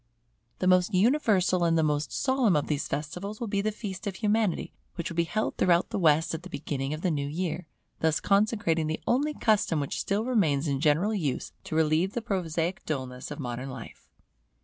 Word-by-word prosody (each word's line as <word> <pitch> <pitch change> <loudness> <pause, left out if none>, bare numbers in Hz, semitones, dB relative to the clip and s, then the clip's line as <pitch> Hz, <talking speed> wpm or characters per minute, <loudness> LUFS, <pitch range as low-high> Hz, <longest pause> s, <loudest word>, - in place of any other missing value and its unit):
The - - -2
most 185 +2 +4
universal 195 -5 +3
and 165 -1 +3
the 160 - +3
most 150 -1 0
solemn 260 - +2
of 150 - +1
these 150 -1 -2
festivals 180 +9 -4
will 235 - -2
be 200 -1 0
the 215 +1 0
feast 205 -2 -6
of 195 - -3
Humanity, 210 -2 0 0.2
which 170 - -4
will - - -6
be 170 0 +2
held 215 +6 -2
throughout 175 -1 +3
the - - -1
West 160 -2 +3
at 160 - -4
the 185 - -10
beginning 140 -3 -3
of 155 +1 -4
the 180 - +1
new 140 -2 -1
year, 165 +1 -3 0.3
thus 160 -1 +2
consecrating 195 -6 +2
the 155 - -3
only 290 +5 +1
custom 205 -8 +2
which 140 - -3
still 205 +3 0
remains 165 - +2
in 140 -2 0
general 160 +8 +2
use 155 -11 -2
to - - -4
relieve 160 +4 +2
the 240 - -2
prosaic 175 -4 -2
dullness 130 -4 -4
of - - -6
modern 125 -2 -4
life. - - -10
170 Hz, 200 wpm, -28 LUFS, 155-205 Hz, 0.3 s, most